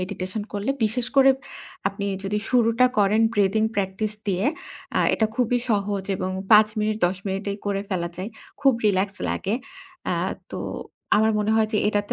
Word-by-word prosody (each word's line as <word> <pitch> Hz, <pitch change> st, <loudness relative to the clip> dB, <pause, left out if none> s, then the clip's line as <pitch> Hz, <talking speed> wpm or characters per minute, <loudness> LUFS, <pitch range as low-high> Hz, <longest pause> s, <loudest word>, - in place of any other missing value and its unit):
Meditation 185 Hz, +2 st, -4 dB
করলে 205 Hz, +5 st, -1 dB
বিশেষ 235 Hz, +3 st, 0 dB
করে 270 Hz, 0 st, +8 dB, 0.6 s
আপনি 200 Hz, -1 st, -5 dB, 0.2 s
যদি 205 Hz, +2 st, 0 dB
শুরুটা 240 Hz, 0 st, +4 dB
করেন 205 Hz, +2 st, +4 dB
ব্রিদিং 205 Hz, +2 st, +3 dB
প্র্যাকটিস 200 Hz, +2 st, -1 dB, 0.2 s
দিয়ে, 190 Hz, +2 st, 0 dB, 0.5 s
আ -, -, +4 dB
এটা 220 Hz, -, +2 dB
খুবই 245 Hz, 0 st, +2 dB
সহজ 200 Hz, -2 st, 0 dB
এবং 185 Hz, -, -2 dB, 0.2 s
৫ 215 Hz, 0 st, +8 dB
মিনিট 215 Hz, 0 st, 0 dB
১০ 180 Hz, +1 st, -2 dB
মিনিটেই 200 Hz, +1 st, -3 dB
করে 200 Hz, -1 st, 0 dB
ফেলা 170 Hz, -3 st, -1 dB
যায়। 190 Hz, +5 st, -5 dB, 0.3 s
খুব 270 Hz, -2 st, +5 dB
রিল্যাক্স 195 Hz, 0 st, +1 dB
লাগে। 200 Hz, +3 st, -1 dB, 0.6 s
আ -, -, +1 dB, 0.4 s
তো -, -, -4 dB, 0.6 s
আমার 220 Hz, +1 st, +3 dB
মনে 210 Hz, +1 st, 0 dB
হয় 220 Hz, -1 st, +3 dB
যে 210 Hz, -, +2 dB
এটাতে 205 Hz, -1 st, 0 dB
205 Hz, 165 wpm, -24 LUFS, 195-220 Hz, 0.6 s, করে